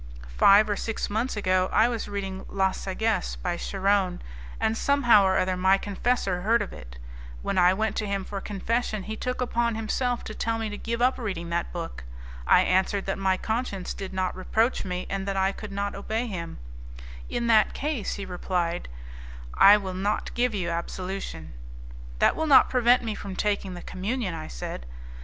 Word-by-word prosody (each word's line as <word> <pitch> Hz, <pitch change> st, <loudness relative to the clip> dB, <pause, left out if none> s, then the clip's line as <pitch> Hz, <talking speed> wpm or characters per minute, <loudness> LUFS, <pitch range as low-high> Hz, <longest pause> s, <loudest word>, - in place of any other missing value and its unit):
Five 200 Hz, -, +6 dB
or 205 Hz, -, 0 dB
six 225 Hz, 0 st, -3 dB
months 225 Hz, +2 st, -1 dB
ago, 185 Hz, -2 st, +2 dB
I 220 Hz, +3 st, +5 dB
was 235 Hz, -2 st, -3 dB
reading 195 Hz, -2 st, -4 dB
La 190 Hz, -1 st, +1 dB
Sagesse, 220 Hz, +4 st, -2 dB
by 175 Hz, -2 st, -3 dB
Charron, 195 Hz, 0 st, 0 dB, 0.4 s
and 220 Hz, -, +1 dB
somehow 240 Hz, -5 st, +4 dB
or 190 Hz, 0 st, +3 dB
other 185 Hz, 0 st, +1 dB
my 190 Hz, +2 st, +4 dB
confessor 200 Hz, -2 st, -1 dB
heard 230 Hz, +5 st, +3 dB
of -, -, -9 dB
it; -, -, -11 dB, 0.5 s
when 190 Hz, -, 0 dB
I 180 Hz, +1 st, +5 dB
went 220 Hz, +2 st, -1 dB
to 210 Hz, -, -1 dB
him 200 Hz, -1 st, -2 dB
for 200 Hz, -1 st, -5 dB
confession, 215 Hz, +1 st, -2 dB
he 220 Hz, +2 st, -5 dB
took 250 Hz, +3 st, -3 dB
upon 235 Hz, -2 st, 0 dB
himself 240 Hz, +2 st, -1 dB
to 215 Hz, -, -7 dB
tell 225 Hz, +1 st, -1 dB
me 225 Hz, -1 st, -3 dB
to -, -, -4 dB
give 235 Hz, +1 st, -2 dB
up 255 Hz, +1 st, +2 dB
reading 180 Hz, -7 st, -4 dB
that 170 Hz, 0 st, -1 dB
book. 165 Hz, -, -6 dB, 0.4 s
I -, -, +6 dB
answered 190 Hz, +2 st, +1 dB
that 195 Hz, -, -2 dB
my 190 Hz, -1 st, +2 dB
conscience 220 Hz, -4 st, -3 dB
did 195 Hz, -1 st, -6 dB
not 185 Hz, -1 st, -1 dB
reproach 220 Hz, +6 st, 0 dB
me, 180 Hz, -1 st, -4 dB
and 195 Hz, 0 st, -3 dB
that 195 Hz, 0 st, -1 dB
I 190 Hz, 0 st, +2 dB
could 210 Hz, +1 st, -8 dB
not 200 Hz, +1 st, -2 dB
obey 220 Hz, +4 st, -2 dB
him. 175 Hz, -7 st, -5 dB, 0.7 s
'In 240 Hz, -, -2 dB
that 220 Hz, -2 st, +4 dB
case,' 285 Hz, -7 st, -2 dB
replied 180 Hz, -2 st, -2 dB
he, -, -, -13 dB, 0.6 s
'I 200 Hz, +2 st, +9 dB
will 190 Hz, -3 st, -5 dB
not 195 Hz, +3 st, -2 dB
give 240 Hz, -2 st, +1 dB
you 175 Hz, -4 st, -1 dB
absolution.' 170 Hz, -, -5 dB, 0.6 s
'That -, -, +3 dB
will 320 Hz, -, -1 dB
not 285 Hz, -, +7 dB
prevent 250 Hz, 0 st, +4 dB
me 225 Hz, -2 st, -2 dB
from 200 Hz, -2 st, -7 dB
taking 200 Hz, -2 st, -1 dB
the 175 Hz, -, -9 dB
communion,' 200 Hz, +1 st, -3 dB
I 160 Hz, -1 st, -6 dB
said. 60 Hz, 0 st, -6 dB
200 Hz, 190 wpm, -26 LUFS, 185-225 Hz, 0.7 s, I